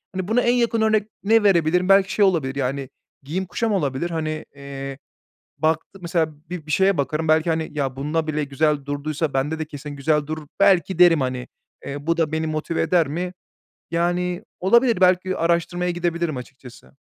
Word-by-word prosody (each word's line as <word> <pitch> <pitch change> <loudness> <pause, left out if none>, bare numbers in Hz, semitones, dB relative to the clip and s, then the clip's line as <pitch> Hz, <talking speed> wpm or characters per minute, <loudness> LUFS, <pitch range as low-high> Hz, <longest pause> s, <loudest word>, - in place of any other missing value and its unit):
Hani, 185 -1 -3
buna 225 +4 +2
en 240 - +3
yakın 235 -2 +1
örnek 215 -1 +2 0.2
ne 225 +2 +4
verebilirim, 180 -1 +3
belki 195 0 +5
şey 205 - +4
olabilir, 160 -9 +1
yani, 135 0 -2 0.3
giyim 175 +7 -3
kuşam 225 +5 -2
olabilir, 150 -2 -1
hani, 155 -2 -3
eee, 135 -1 -7 0.6
baktı 160 +5 -1
mesela 170 -2 0 0.2
bir 175 -4 -6
bir 155 - -6
şeye 190 +4 +3
bakarım 155 +3 -1
belki, 160 +2 +3
hani, 160 0 -1
"Ya, 140 -3 -2
bunda 155 +4 -2
bile 155 -1 -1
güzel 145 0 0
durduysa 145 +1 -2
bende 145 +4 -1
de 155 - -2
kesin 150 -1 -8
güzel 145 +1 0
durur" 155 -1 -5
belki 190 -2 +3
derim, 170 -4 +6
hani. 130 -1 -3 0.4
Eee, 145 +2 -6
bu 165 - +2
da 160 -2 +1
beni 160 0 -1
motive 155 +1 -2
eder 165 0 +2
mi? 175 +5 -3 0.6
Yani, 175 +2 0 0.2
olabilir, 235 +2 +3
belki 185 0 +3
araştırmaya 170 +1 0
gidebilirim 170 -4 -2
açıkçası. 130 +1 -12
160 Hz, 175 wpm, -22 LUFS, 145-180 Hz, 0.6 s, derim